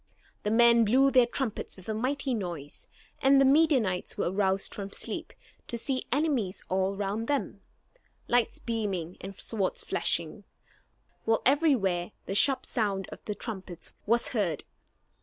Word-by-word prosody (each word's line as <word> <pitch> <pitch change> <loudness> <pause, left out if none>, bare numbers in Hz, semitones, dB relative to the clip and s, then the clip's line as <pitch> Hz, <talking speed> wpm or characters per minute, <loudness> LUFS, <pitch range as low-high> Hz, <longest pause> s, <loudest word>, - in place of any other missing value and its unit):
The 210 - -1
men 235 +1 +6
blew 265 +6 +4
their 250 -2 +5
trumpets 240 -2 -3
with 185 - -14
a 220 - -1
mighty 265 +4 -1
noise; 175 -9 -4 0.3
and 270 +1 +6
the 275 - +5
Midianites 265 - +3
were - - 0
roused 195 0 0
from 200 -1 -6
sleep, - - -5 0.4
to 235 - -3
see 260 +2 -2
enemies 260 -9 0
all 190 +1 0
round 205 +3 -2
them, 285 -1 -2 0.7
lights 240 -1 +2
beaming 195 -7 -3
and 195 +1 -7
swords 195 -1 -2
flashing, - - -1 0.8
while 225 0 +2
everywhere 240 - +2
the - - -3
sharp 265 +6 +5
sound 200 -4 -1
of - - -10
the 210 - -3
trumpets 190 -7 -7 0.2
was 235 +2 +2
heard. 190 - -1
220 Hz, 145 wpm, -29 LUFS, 195-255 Hz, 0.8 s, men